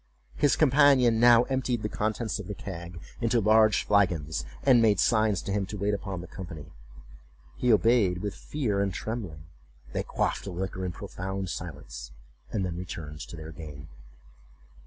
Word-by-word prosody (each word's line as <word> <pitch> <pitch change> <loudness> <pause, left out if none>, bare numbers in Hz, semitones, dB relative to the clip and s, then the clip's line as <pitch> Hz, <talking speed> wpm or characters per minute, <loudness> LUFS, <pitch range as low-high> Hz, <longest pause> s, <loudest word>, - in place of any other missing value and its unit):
His 145 - +3
companion 135 -5 +5
now 120 0 +7
emptied 125 -3 -1
the - - 0
contents 110 +1 -2
of 100 - -7
the 105 - -5
keg 85 -3 -7 0.2
into 115 0 +2
large 110 0 +4
flagons, 85 -9 +1 0.2
and 120 -3 +6
made 110 -2 +4
signs 110 -5 +2
to - - -4
him 100 -1 -1
to 105 - -6
wait 100 +1 0
upon 95 -3 -4
the 90 - -9
company. 85 -5 -9 0.8
He 125 - +2
obeyed 105 -3 +4
with 100 -2 -2
fear 115 -10 -2
and 100 -1 0
trembling; 95 -8 -5 0.5
they - - 0
quaffed - - -1
the 100 - -5
liquor 95 +1 -4
in - - -3
profound 95 +1 -5
silence, 65 -7 -7 0.4
and 100 -4 -1
then 85 -1 -4
returned 80 -4 -7
to - - -9
their 80 0 -8
game. 75 -2 -10
100 Hz, 165 wpm, -28 LUFS, 85-115 Hz, 0.8 s, now